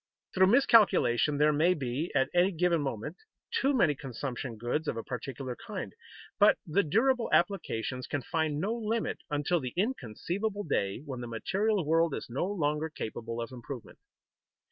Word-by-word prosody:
Through 190 0 +5
miscalculation 195 - +4
there 150 +1 +4
may 170 +5 +3
be, 140 +2 -3
at 130 0 +2
a 180 +2 +4
given 175 -2 +1
moment, 135 - -4 0.3
too 275 - +2
many 200 - +3
consumption 130 -2 -5
goods 120 +8 -2
of 115 - -1
a 115 - -3
particular 125 0 -5
kind, - - -5 0.5
but - - +6
the 165 +6 +2
durable 230 - +2
applications 130 - 0
can 145 -3 -3
find 160 -2 -1
no 200 +7 0
limit 230 -1 -2
until 150 +4 +1
the 125 -4 -5
inconceivable 200 - -2
day 100 - -1
when 130 -4 -5
the 120 - -5
material 190 - 0
world 165 0 +2
is - - -7
no 135 +8 -1
longer 155 -5 -1
capable 115 -4 -5
of 115 +2 -4
improvement. 125 0 -9
150 Hz, 160 wpm, -30 LUFS, 125-190 Hz, 0.5 s, but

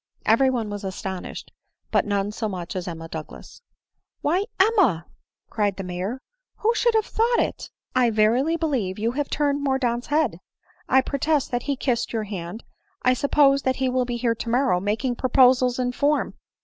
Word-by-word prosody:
Every 245 +5 +4
one 230 -5 -2
was 205 -1 -5
astonished; 190 -1 -6 0.4
but - - +2
none 200 0 0
so 215 0 -3
much 180 -3 -6
as 185 -1 -4
Emma 165 -1 -6
Douglas. 160 - -9 0.3
" - - -56
Why, 355 +7 +1
Emma 375 - +3 0.2
!" - - -57
cried 205 -3 0
the 195 - -4
Major, 185 +7 -4 0.2
" - - -61
who 455 +2 +3
should 470 -1 +2
have 435 -1 +3
thought 470 +2 +1
it? - - -2 0.3
I 250 -2 +4
verily 235 +9 +2
believe 255 - -1
you 225 +2 0
have 285 +2 -3
turned 285 -1 0
Mordaunt's 250 -3 0
head; 290 - +1 0.3
— - - -33
I 265 - +5
protest 285 +2 0
that 245 0 0
he 280 - +2
kissed 245 -3 -1
your 225 -1 -1
hand; 195 0 -6 0.2
— - - -43
I 255 - +4
suppose 275 +1 +3
that 260 -1 0
he 260 0 0
will 255 0 +1
be 240 -1 -3
here 235 -1 +1
tomorrow, 235 -3 +1
making 220 +6 -1
proposals 255 -1 +4
in 250 -1 0
form." 290 +4 0
245 Hz, 190 wpm, -24 LUFS, 205-280 Hz, 0.4 s, I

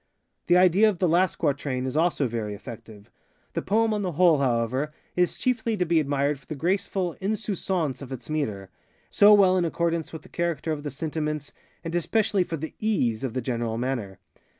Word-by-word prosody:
The 175 - +5
idea 185 +4 +5
of 200 - -3
the 180 - +2
last 175 +3 +2
quatrain 140 -4 -1
is 130 - -3
also 160 -3 +2
very 110 -3 -4
effective. 105 0 -11 0.4
The - - -1
poem 220 +2 +2
on 210 - -1
the 180 -3 -2
whole, 165 -2 +4
however, 130 +3 0 0.2
is 180 -1 +1
chiefly 230 -3 0
to 180 - +1
be 165 -1 +3
admired 140 -1 0
for 135 - -25
the 155 - -5
graceful 180 +2 -1
_insouciance 190 - -1
_of 135 -1 -9
its 125 -3 -7
metre, 105 -11 -3 0.4
so 205 +1 +7
well 190 -2 +5
in 180 - +2
accordance 170 -1 -1
with 160 - -8
the - - -14
character 170 -2 -2
of 150 -2 -3
the 145 - -4
sentiments, 150 0 -3 0.3
and 165 -1 -5
especially 195 +3 +1
for 165 -2 -4
the 160 +2 -6
_ease 130 - +1
_of 130 -3 -4
the 130 - -2
general 115 -2 -2
manner. 120 -6 -3
155 Hz, 195 wpm, -26 LUFS, 130-180 Hz, 0.4 s, so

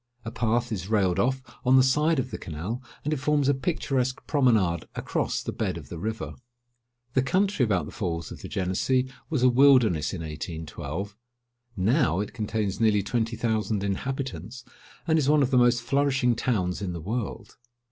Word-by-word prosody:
A 115 - -4
path 120 +1 0
is 95 -4 -3
railed 95 -4 +2
off 130 +4 +1 0.2
on 130 +1 +4
the 130 - +7
side 150 +5 +3
of 130 -1 -2
the - - -5
canal, 90 - -5 0.2
and 150 - +1
it - - 0
forms 145 0 +2
a 140 - +4
picturesque 135 -3 -1
promenade 110 - +2
across - - -2
the - - -3
bed - - -2
of - - -10
the 85 - -6
river. 110 +4 -4 0.8
The 130 - +3
country 185 +3 +1
about 95 -9 +1
the - - -9
Falls 85 -6 -3
of - - -9
the - - -7
Genessee 125 +8 0 0.2
was 150 -6 0
a - - +7
wilderness 125 - +5
in 90 - -5
1812. 80 +4 -5 0.6
Now 110 - +2
it 105 - -3
contains 105 -4 -2
nearly 105 -3 +3
twenty 115 +2 -1
thousand 110 -3 -1
inhabitants, 115 - -4 0.4
and 160 -1 +3
is 140 -2 +1
one 150 -1 +5
of 130 - 0
the 130 - +4
most 120 0 +3
flourishing 135 -3 +2
towns 100 -7 -1
in 95 -3 -3
the 85 - -5
world. 110 +5 -4
115 Hz, 180 wpm, -26 LUFS, 95-130 Hz, 0.8 s, the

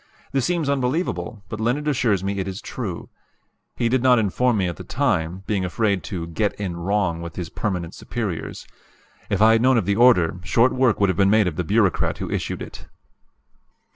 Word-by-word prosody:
This 135 -2 0
seems 170 -4 0
unbelievable; 125 - -1
but 105 - -6
Leonard 125 +7 0
assures 115 -9 +1
me 100 0 -2
it 95 - -2
is 95 +1 -5
true. 105 -9 -6 0.7
He 120 - 0
did 125 +1 +1
not 125 -1 +5
inform 115 +3 +1
me 95 -2 +1
at 85 - -4
the - - -8
time, 95 - -1
being 100 -3 -1
afraid 100 +1 0
to 90 -5 -4
"get 100 +6 -2
in 95 -4 -3
wrong" 90 -1 -1
with 85 0 -7
his 90 -3 -5
permanent 90 -5 -3
superiors. 105 -9 -5 0.6
If 100 +1 +2
I 110 - +7
had 115 0 +4
known 130 0 +4
of 110 - +1
the 100 +1 +1
order, 90 -9 +4
short 115 +7 +3
work 130 -4 +2
would 100 -1 +3
have 90 - -6
been 95 0 +5
made 110 0 +4
of 90 -4 -2
the 90 - -1
bureaucrat 100 +1 +1
who - - -5
issued - - -3
it. - - -11
105 Hz, 200 wpm, -22 LUFS, 90-120 Hz, 0.7 s, I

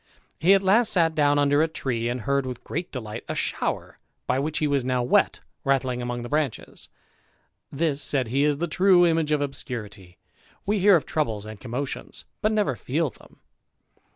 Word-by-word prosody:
He 185 +6 +6
at 195 - +1
last 220 +4 +4
sat 165 -3 +3
down 145 -1 +3
under 145 +1 +3
a 160 - +3
tree, 120 -7 -2
and 125 0 -3
heard 140 +3 0
with' 125 -1 -7
great 175 +3 -4
delight 115 -4 -6
a - - -2
shower, - - -3 0.3
by 130 - 0
which 155 +3 -2
he 155 - +1
was 140 -3 +1
now 125 -1 0
wet, 120 - +2 0.2
rattling 130 -2 0
among 120 0 -4
the - - -5
branches: 145 -3 -3 0.8
This, 145 -1 0
said 130 -5 +1
he, 135 +4 +1
is 145 -1 +2
the 170 +3 -2
true 180 +2 +4
image 160 -2 +1
of 150 -1 +2
obscurity; 115 - -6 0.5
we 205 +1 +1
hear 200 +1 +6
of 165 - +1
troubles 110 -9 -2
and 110 -1 -9
commotions, 130 +3 -5 0.2
but 215 - +2
never 210 - +1
feel 145 +4 -1
them. - - -20
140 Hz, 185 wpm, -25 LUFS, 125-160 Hz, 0.8 s, He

